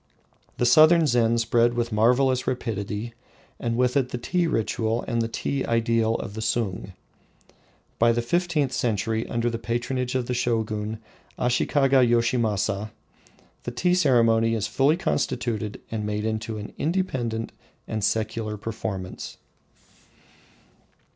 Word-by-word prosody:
The 120 Hz, -, +1 dB
southern 155 Hz, +6 st, +6 dB
Zen 120 Hz, -4 st, +2 dB
spread 115 Hz, +1 st, +2 dB
with 120 Hz, 0 st, -1 dB
marvelous 125 Hz, +4 st, +2 dB
rapidity, 110 Hz, -2 st, -3 dB, 0.5 s
and 115 Hz, -1 st, -2 dB
with 125 Hz, +1 st, +2 dB
it 135 Hz, -3 st, +2 dB
the 125 Hz, -, -4 dB
tea 175 Hz, +8 st, 0 dB
ritual 115 Hz, -3 st, -1 dB
and 115 Hz, -1 st, 0 dB
the 115 Hz, -, 0 dB
tea 135 Hz, +4 st, -2 dB
ideal 115 Hz, -1 st, +1 dB
of 100 Hz, -, -5 dB
the 110 Hz, -, -5 dB
Sung. 110 Hz, -4 st, -2 dB, 1.1 s
By 115 Hz, +1 st, +5 dB
the 120 Hz, 0 st, 0 dB
fifteenth 160 Hz, -1 st, 0 dB
century, 110 Hz, -2 st, -1 dB
under 120 Hz, 0 st, -1 dB
the 115 Hz, -1 st, -2 dB
patronage 120 Hz, +3 st, -2 dB
of 130 Hz, -2 st, 0 dB
the 125 Hz, -, -2 dB
Shogun, 110 Hz, -3 st, -1 dB, 0.4 s
Ashikaga 130 Hz, +2 st, +3 dB
Voshinasa, 115 Hz, -4 st, +1 dB, 0.7 s
the -, -, -5 dB
tea 175 Hz, +10 st, +1 dB
ceremony 115 Hz, -8 st, +3 dB
is 110 Hz, -2 st, -1 dB
fully 145 Hz, +4 st, +2 dB
constituted 115 Hz, -, -2 dB
and 110 Hz, -2 st, -2 dB
made 105 Hz, 0 st, -2 dB
into 110 Hz, 0 st, -3 dB
an 105 Hz, 0 st, -8 dB
independent 130 Hz, -10 st, -1 dB, 0.4 s
and 110 Hz, -2 st, -3 dB
secular 110 Hz, +1 st, -1 dB
performance. 100 Hz, -3 st, -6 dB
115 Hz, 130 wpm, -25 LUFS, 110-125 Hz, 1.1 s, southern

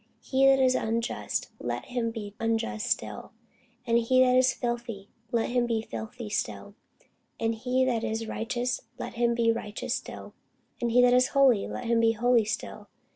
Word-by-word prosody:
He 270 Hz, 0 st, +3 dB
that 270 Hz, 0 st, +6 dB
is 260 Hz, -1 st, +4 dB
unjust, 230 Hz, 0 st, -2 dB
let -, -, -4 dB
him 245 Hz, -2 st, -2 dB
be 215 Hz, -3 st, -7 dB
unjust 225 Hz, 0 st, -1 dB
still: -, -, -3 dB, 0.5 s
and 235 Hz, -1 st, +3 dB
he 255 Hz, +2 st, +3 dB
which 250 Hz, 0 st, +3 dB
is 255 Hz, 0 st, +5 dB
filthy, 235 Hz, -5 st, -4 dB, 0.2 s
let 235 Hz, 0 st, 0 dB
him 245 Hz, -1 st, +1 dB
be 225 Hz, -2 st, -1 dB
filthy 110 Hz, -, -7 dB
still: 105 Hz, -, -3 dB, 0.7 s
and 225 Hz, 0 st, +1 dB
he 255 Hz, +3 st, 0 dB
that 235 Hz, -3 st, 0 dB
is 225 Hz, +1 st, -2 dB
righteous, 245 Hz, +3 st, -2 dB, 0.2 s
let -, -, -6 dB
him 235 Hz, 0 st, +1 dB
be 230 Hz, -1 st, +3 dB
righteous 215 Hz, -2 st, -4 dB
still: -, -, -6 dB, 0.5 s
and 240 Hz, -, +1 dB
he 245 Hz, +2 st, +5 dB
that 245 Hz, 0 st, +5 dB
is 250 Hz, +1 st, +5 dB
holy, 255 Hz, -7 st, +5 dB
let -, -, -6 dB
him 230 Hz, 0 st, +2 dB
be 225 Hz, 0 st, +4 dB
holy 235 Hz, 0 st, +3 dB
still. 215 Hz, -, -5 dB
235 Hz, 180 wpm, -28 LUFS, 225-250 Hz, 0.7 s, that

